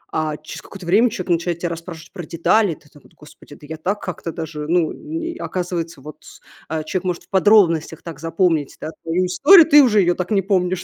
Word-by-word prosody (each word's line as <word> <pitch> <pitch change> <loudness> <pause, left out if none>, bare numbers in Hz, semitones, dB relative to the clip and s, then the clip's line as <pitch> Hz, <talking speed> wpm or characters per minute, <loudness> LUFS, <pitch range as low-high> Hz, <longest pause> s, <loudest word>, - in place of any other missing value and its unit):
А 155 -1 -1
через 155 - -10
какое-то 195 -2 -12 0.2
человек 185 -4 -6
начинает 170 0 0
тебя 175 - -2
расспрашивать 165 0 -9
про 175 - -7
детали. 170 +3 +1
Ты - - -23
так 145 -1 -20
вот: - - -22
"Господи, 150 -1 -16
да 150 - -15
я 160 +1 -7
так 195 +6 -2
как-то 175 -2 -5
даже, 155 -2 -6
ну, 170 -1 +1
н 330 +2 -6
оказывается, 175 -4 -4
вот". 150 +2 -12 0.4
А 160 0 -3
человек 175 +4 -3
может 180 -2 -3
в - - -28
подробностях 190 -5 +3
так 165 -4 -9
запомнить. 165 -2 0
Да? 155 - -6
Твою 170 +3 0
историю. 310 - +6
Ты 295 -2 +8
уже 215 -5 +4
её 175 -1 +2
так 180 -1 -4
не 200 -2 +3
помнишь. 185 -2 0
175 Hz, 210 wpm, -20 LUFS, 160-190 Hz, 0.4 s, Ты